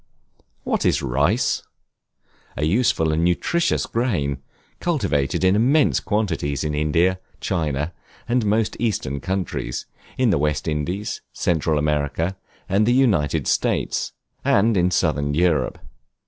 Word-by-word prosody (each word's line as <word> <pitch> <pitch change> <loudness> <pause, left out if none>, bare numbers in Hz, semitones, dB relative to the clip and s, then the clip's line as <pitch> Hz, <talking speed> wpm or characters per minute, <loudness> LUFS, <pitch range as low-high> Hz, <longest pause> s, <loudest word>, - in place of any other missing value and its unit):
What - - 0
is - - +2
Rice? 70 - +1 1.0
A 75 - 0
useful 95 -4 +2
and 80 +2 +1
nutritious 170 - +1
grain, 75 - -1 0.4
cultivated 80 - 0
in 95 +1 +4
immense 135 +8 +3
quantities 90 -10 -1
in 75 -1 -2
India, 85 +5 +2 0.2
China, 75 -3 -1 0.3
and 120 0 +1
most 105 +1 +1
eastern 100 - -1
countries; 90 -8 -3 0.3
in 125 -4 +3
the 70 - +2
West 75 +1 -1
Indies, 90 +8 -2
Central 80 -2 0
America, 75 +4 0 0.3
and 100 +3 +2
the 120 - +4
United 105 - +2
States; - - 0 0.3
and 110 +3 +3
in 90 -1 +3
southern 75 -5 0
Europe. 80 -6 +1
85 Hz, 120 wpm, -22 LUFS, 75-105 Hz, 1.0 s, in